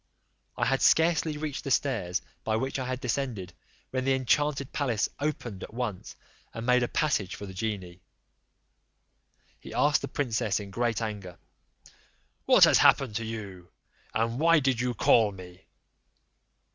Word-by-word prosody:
I - - +1
had 135 +2 +1
scarcely 160 -2 +3
reached 150 -2 -4
the 140 - -4
stairs 95 -10 0 0.2
by 110 - 0
which 130 +4 -2
I 130 - -3
had 130 0 -3
descended, 115 -7 -3 0.4
when 130 0 -1
the 135 0 +2
enchanted 140 +2 0
palace 125 -7 0
opened 125 -9 -3
at - - -9
once, 115 -7 -4 0.4
and 115 - -5
made 125 0 +4
a 120 - +1
passage 115 -12 0
for 100 - -8
the 95 - -9
genie: 95 -3 -5 1.6
he - - -10
asked 150 0 +3
the - - -4
princess 115 -6 -1
in 100 -1 -8
great 115 +1 -1
anger, 100 -5 -6 1.1
"What - - +7
has - - +7
happened 130 -6 +4
to 115 - -4
you, 100 -6 -7 0.4
and 115 +3 -1
why 165 0 +5
did 130 -4 0
you 125 -1 -1
call 110 -2 +4
me?" 90 -1 -13
120 Hz, 155 wpm, -28 LUFS, 105-135 Hz, 1.6 s, What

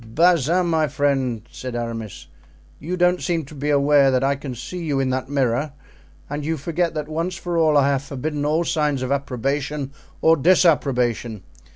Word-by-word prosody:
"Bazin, 175 +1 +3
my 160 -2 +1
friend," 135 -6 0
said 125 -2 -6
Aramis, 115 -3 -5 0.5
"you 175 +5 -4
don't 180 0 +2
seem 170 -4 -1
to 140 - -13
be 145 0 -3
aware 140 -1 +4
that 130 0 +1
I 140 +1 +2
can 135 -2 -7
see 180 +9 -7
you 145 -4 -1
in 130 -1 0
that 130 0 -3
mirror, 140 +1 0 0.5
and 145 +1 -4
you 160 +2 -1
forget 170 +3 -1
that 150 -1 -3
once 165 +4 -3
for 175 0 -4
all 160 -3 +4
I 140 -1 +4
have 135 -2 +1
forbidden 145 +2 -4
all 155 +3 +1
signs 150 -5 0
of 130 - -3
approbation 140 +1 -2 0.3
or 165 0 +4
disapprobation. 125 - +2
145 Hz, 180 wpm, -22 LUFS, 130-160 Hz, 0.5 s, aware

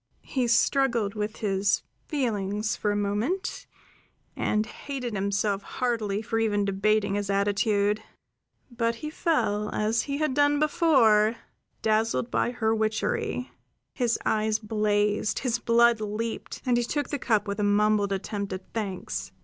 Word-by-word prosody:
He 255 -3 -1
struggled 235 -3 +2
with 210 0 -3
his 195 0 +1 0.2
feelings 210 -6 -1
for 210 - -1
a - - 0
moment, 205 - -2 0.7
and 215 0 0
hated 250 0 -6
himself 200 0 0
heartily 220 -3 -2
for 225 +1 -1
even 205 -2 +1
debating 200 +1 +1
his 205 -1 -2
attitude. 205 +1 +1 0.7
But 230 -1 0
he 305 +6 -6
fell, 210 - 0
as 220 +2 +1
he 280 -1 -3
had 305 -3 0
done 290 +1 +3
before, 260 -9 +4 0.5
dazzled 225 +2 +1
by - - +1
her 225 -2 0
witchery. 220 +3 -1 0.4
His 240 -3 +1
eyes 215 0 +1
blazed, 210 -1 0
his 240 -3 0
blood 235 -1 +4
leaped, 215 +2 -4
and 245 -2 +3
he 240 - +2
took 290 +4 -2
the 285 - -2
cup 215 -4 +1
with 200 +1 -3
a - - +1
mumbled 205 0 +3
attempt 200 0 -3
at 185 0 -5
thanks. 200 -5 -4
215 Hz, 140 wpm, -27 LUFS, 205-240 Hz, 0.7 s, before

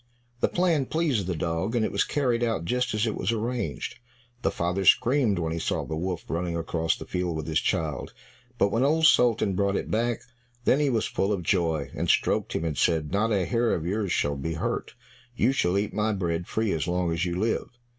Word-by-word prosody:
The - - +3
plan 170 -7 +1
pleased 145 - 0
the 90 - -1
dog, 85 +7 -2
and 115 -2 +2
it - - -2
was - - +2
carried 125 -5 0
out 115 -8 -1
just 125 +3 0
as 105 +2 +1
it 110 - -1
was 95 - -1
arranged. 115 +2 -3 0.4
The - - +2
father 90 +3 -1
screamed 120 - +4
when 80 -2 -1
he 85 - -2
saw - - -1
the 80 - -4
Wolf 90 +1 -3
running 85 0 -2
across 80 0 0
the - - -8
field 90 -3 -2
with 80 - -4
his 80 -1 +1
child, 75 -3 -2 0.5
but 100 - +3
when 115 - +1
Old 160 +3 +3
Sultan 115 -8 +4
brought 100 +1 +1
it - - -3
back, 115 +1 0 0.4
then 130 - +3
he 145 -2 +2
was 115 -4 +1
full 95 +2 -1
of 95 -4 -1
joy, 80 -6 0
and - - -2
stroked - - +2
him 80 - -1
and 75 -4 -2
said, 80 -3 +1
"Not 105 +4 +1
a 95 -4 +2
hair 115 +2 +1
of 80 - -4
yours 100 +1 -1
shall 75 0 +1
be 80 +5 -3
hurt, 80 - -3 0.4
you 125 - +3
shall 95 -9 +1
eat 100 +1 -1
my 110 0 +1
bread 85 -3 -2
free 110 -2 0
as 80 0 -1
long 90 -1 0
as 85 0 -1
you 90 -1 -1
live." 110 +2 0
95 Hz, 225 wpm, -26 LUFS, 85-115 Hz, 0.5 s, screamed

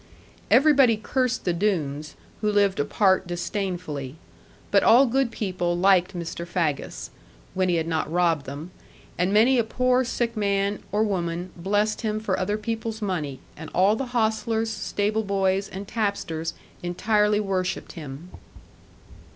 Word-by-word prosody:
Everybody 270 -6 +5
cursed 255 +3 -1
the 175 - +2
Doones, 155 -6 -1 0.3
who 210 -1 +1
lived 200 -2 +2
apart 190 +5 +2
disdainfully. 175 -6 -4 0.6
But - - +5
all 250 +4 +6
good 265 0 +1
people 180 -5 -2
liked 185 0 +3
Mr. 170 0 -5
Faggus 165 -5 -2 0.4
when 185 0 +1
he 175 - +2
had 165 -1 0
not 160 -2 -1
robbed 170 -4 +1
them 145 +6 -7 0.5
and 180 +2 +2
many 235 +5 +5
a - - +3
poor 255 +3 +2
sick 240 -1 -2
man 200 -1 0
or 210 +2 +2
woman 175 -3 -2
blessed 205 +4 0
him 215 -2 -1
for 205 -3 -1
other 205 +3 0
people's 225 0 -4
money; 155 -9 -3
and 160 +1 -9
all 195 +4 +4
the 265 +3 -3
hostlers, 225 -1 0
stable 215 +1 -1
boys, 195 -1 0
and 195 +1 -7
tapsters 195 -7 -2 0.3
entirely 210 +4 +1
worshipped 190 -3 -2
him. 150 +2 -9
195 Hz, 145 wpm, -25 LUFS, 175-220 Hz, 0.6 s, all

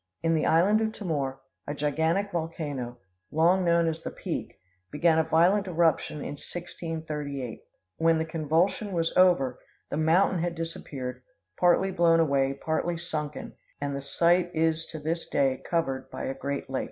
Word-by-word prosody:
In 165 0 +3
the 160 - +1
island 195 +7 +4
of 220 0 0
Timor, 140 -10 -3 0.3
a 145 - -3
gigantic 160 +7 0
volcano, 150 -7 -4 0.3
long 175 +4 +3
known 170 -1 +3
as 160 0 -2
the - - -4
Peak, - - -5 0.3
began 160 +2 +3
a - - +4
violent 175 +5 +3
eruption 165 -3 +1
in 145 - -5
1638. 155 -7 -5 0.4
When 165 0 +3
the 160 - 0
convulsion 165 +6 0
was 165 -1 0
over 155 -9 +4 0.3
the - - -1
mountain 170 +4 +3
had 170 0 -1
disappeared; 135 -6 -5 0.3
partly 180 +2 +3
blown 170 -2 +4
away, 140 -4 +2
partly 160 +3 -1
sunken, 155 -3 -5 0.3
and 140 -1 -2
the 140 - -4
site 175 +5 +2
is 160 0 +1
to 160 - -7
this 160 +2 -2
day 135 -2 +1
covered 135 -6 -1
by - - -6
a 135 - -2
great 140 +1 -4
lake. 135 0 -2
160 Hz, 160 wpm, -27 LUFS, 145-170 Hz, 0.4 s, island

